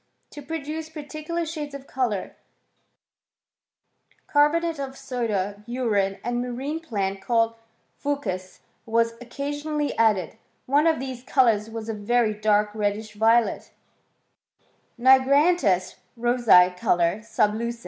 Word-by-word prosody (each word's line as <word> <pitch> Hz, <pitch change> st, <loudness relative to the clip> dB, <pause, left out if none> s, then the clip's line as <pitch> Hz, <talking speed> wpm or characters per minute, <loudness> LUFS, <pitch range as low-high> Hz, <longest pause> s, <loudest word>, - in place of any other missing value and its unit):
* -, -, -47 dB
To 295 Hz, -, -8 dB
produce 315 Hz, +1 st, -5 dB
particular 310 Hz, +2 st, -5 dB
shades 300 Hz, -3 st, -6 dB
of 275 Hz, -1 st, -9 dB
colour, 245 Hz, -8 st, -2 dB, 1.9 s
carbonate 320 Hz, +2 st, +2 dB
of 270 Hz, -1 st, -5 dB
soda, 210 Hz, -7 st, -3 dB
urine, 210 Hz, -6 st, 0 dB
and 240 Hz, +1 st, -1 dB
a 250 Hz, -, -5 dB
marine 275 Hz, +6 st, -4 dB
plant 195 Hz, -10 st, -3 dB
called 230 Hz, -1 st, +1 dB, 0.5 s
/ucws, 190 Hz, -11 st, -3 dB, 0.3 s
were 230 Hz, +1 st, +1 dB
occasionally 290 Hz, +4 st, -3 dB
added: 210 Hz, -7 st, +2 dB, 0.3 s
one 290 Hz, +4 st, +3 dB
of 320 Hz, -1 st, +2 dB
these 260 Hz, -2 st, -6 dB
colours 230 Hz, -5 st, +2 dB
was 225 Hz, -1 st, -6 dB
a 225 Hz, -, -2 dB
very 220 Hz, +1 st, +1 dB
dark 210 Hz, 0 st, +1 dB
reddish 215 Hz, 0 st, -2 dB
violet—" 225 Hz, +2 st, +2 dB, 1.3 s
Nigramtis 265 Hz, -, +4 dB, 0.2 s
rosee 230 Hz, -7 st, +5 dB
colore 175 Hz, +2 st, +1 dB
sub 220 Hz, -1 st, +1 dB
luQens.'' 235 Hz, +2 st, -3 dB
240 Hz, 120 wpm, -24 LUFS, 210-285 Hz, 1.9 s, rosee